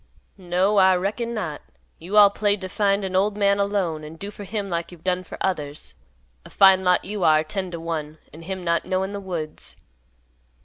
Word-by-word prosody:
"No, 185 +3 +1
I 190 -1 +6
reckon 215 +6 -2
not. 165 -9 -4 0.4
You 185 +6 -3
all 205 -1 +8
played 205 0 0
to 185 - -5
find 200 0 +1
an 185 -1 -4
old 200 +2 +1
man 200 -1 +2
alone, 195 -6 -1
and 155 +2 -10
do 200 +4 -6
for 205 -1 -9
him 205 0 -3
like 170 -2 -3
you've 170 -2 -14
done 185 0 0
for - - -10
others. 150 - -3 0.5
A - - -13
fine 190 -1 +5
lot 180 -1 +2
you 205 -1 -4
are, 155 -1 +5
ten 185 +4 -4
to 170 -1 -6
one, 160 -2 -4 0.2
and 165 +2 -11
him 190 0 -5
not 170 -1 +1
knowin' 190 +1 -1
the 200 - -5
woods." 170 -6 -6
185 Hz, 205 wpm, -23 LUFS, 170-200 Hz, 0.5 s, all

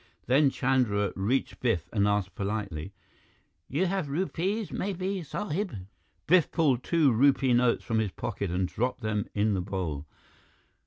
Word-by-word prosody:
Then 135 +3 +4
Chandra 125 -7 +1
reached 110 +8 -1
Biff 100 -9 0
and 100 -2 +3
asked 100 -3 0
politely, 100 -4 -3 0.8
"You 155 +8 0
have 185 -5 -1
rupees, 190 +6 -1
maybe, 190 0 -2
sahib?" 185 - -3 0.5
Biff 175 0 +4
pulled 140 -7 +2
two 160 -5 +3
rupee 130 +2 +4
notes 120 0 +3
from 115 -2 0
his 110 -2 0
pocket 100 +1 -4
and 90 +1 0
dropped 125 +5 -2
them 110 -2 -1
in 105 0 +2
the 95 - 0
bowl. 90 -6 -4
125 Hz, 145 wpm, -28 LUFS, 100-155 Hz, 0.8 s, Then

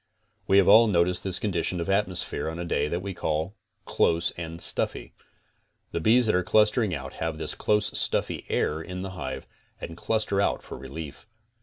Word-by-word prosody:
We 95 - +4
have 100 - +5
all 115 +3 +8
noticed 90 -2 +1
this 95 -2 +1
condition 90 -3 -1
of 85 - -3
atmosphere 95 -4 0
on 80 - -6
a 85 - -4
day 75 -3 0
that 85 +4 -2
we 100 -1 -4
call 80 +2 -2 0.3
close 85 0 +1
and 85 -1 -7
stuffy. - - -1 0.8
The - - -2
bees 115 +8 +4
that 110 - +2
are 90 - +3
clustering 105 +2 +3
out - - -7
have 80 -1 -2
this 80 - -1
close 105 0 +1
stuffy - - 0
air 80 +1 0
in 90 +3 -6
the 95 - -5
hive 65 -6 -6 0.3
and 80 - -7
cluster 105 +1 0
out - - 0
for - - -8
relief. 70 +6 -9
90 Hz, 185 wpm, -26 LUFS, 80-100 Hz, 0.8 s, all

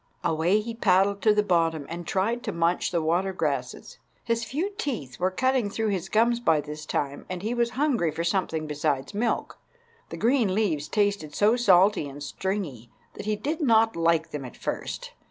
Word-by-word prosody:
Away 170 +6 +2
he 230 +2 -5
paddled 200 -2 +2
to 215 - +5
the 210 0 +3
bottom 165 -5 +1
and 170 +1 -7
tried 225 +6 0
to - - -1
munch 170 +1 +1
the 170 -2 -1
water 175 +4 +1
grasses. 140 -8 -3 0.2
His 230 0 0
few 305 - -2
teeth 160 - -4
were 185 +1 +2
cutting 255 +2 +1
through 220 +1 -1
his 195 -2 -2
gums 235 +2 +3
by 160 -10 +3
this 150 +1 -7
time, 140 0 -2
and 185 0 -5
he 220 +3 -1
was 240 -1 +1
hungry 265 - +2
for 160 +2 -3
something 170 -3 -1
besides 150 0 -2
milk. 225 +2 -1 0.5
The - - -6
green 230 -5 +2
leaves 165 -9 0
tasted 200 -8 0
so 215 +3 +4
salty 195 -8 +4
and 145 +1 -9
stringy 155 - -4 0.2
that - - -8
he 215 - +1
did 295 - -3
not 225 -4 +4
like 165 -1 +1
them 145 -2 -5
at 125 - -10
first. - - -4
190 Hz, 190 wpm, -26 LUFS, 160-225 Hz, 0.5 s, to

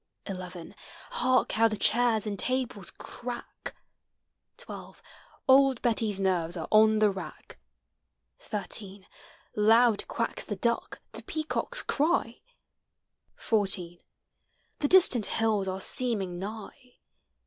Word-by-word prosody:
11 180 -3 -7 0.4
Hark 255 - +2
how 225 +1 +4
the 215 -1 -3
chairs 230 -1 +2
and 205 -2 -4
tables 255 -7 -1
crack! 240 0 -8 0.8
12 - - -10 0.5
Old 265 -2 +5
Betty's 220 -4 0
nerves 180 -3 0
are 160 - -5
on 220 0 +6
the 215 -1 +4
rack; 170 - -9 0.8
13 200 -2 -5 0.5
Loud 225 +1 +4
quacks 230 - -2
the 205 - -4
duck, 235 +4 -2
the - - -9
peacocks 320 +10 -3
cry, 295 -6 0 0.9
14 190 -5 -1 0.8
The 290 - +1
distant 275 - +5
hills 215 -2 0
are 190 0 -3
seeming 195 -5 -1
nigh. 220 +5 -9
220 Hz, 105 wpm, -28 LUFS, 195-245 Hz, 0.9 s, on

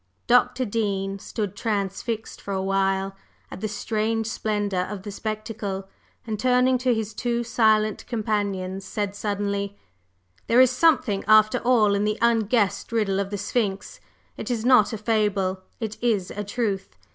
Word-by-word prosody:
Dr. 250 +1 +3
Dean 200 -3 -2
stood 205 -1 -4
transfixed 215 +1 -3
for 200 - -4
a 190 - -1
while 195 0 0 0.4
at - - -8
the 215 - -1
strange 220 +1 -1
splendor 205 -4 -1
of 200 -2 -6
the 205 - -6
spectacle, 210 -2 -4 0.4
and 215 -2 -3
turning 255 +1 +3
to 255 0 +2
his 220 -2 -1
two 235 +2 -1
silent 220 -2 +2
companions, 200 -5 -2
said 200 +1 -3
suddenly: 200 -1 -2 0.7
"There 235 - +4
is 255 -1 +7
something, 255 -8 +2
after 215 0 +5
all, 225 -5 +3
in 200 0 +1
the 210 +1 0
unguessed 225 -3 +1
riddle 210 -4 +1
of 200 -1 -2
the 205 - -3
Sphinx. 205 -1 -2 0.4
It - - -5
is 235 -2 -1
not 250 -5 +5
a 220 - -3
fable; 205 -4 0 0.2
it 220 -2 -5
is 215 -6 0
a 205 - -4
truth. 200 - -3
210 Hz, 155 wpm, -24 LUFS, 200-230 Hz, 0.7 s, is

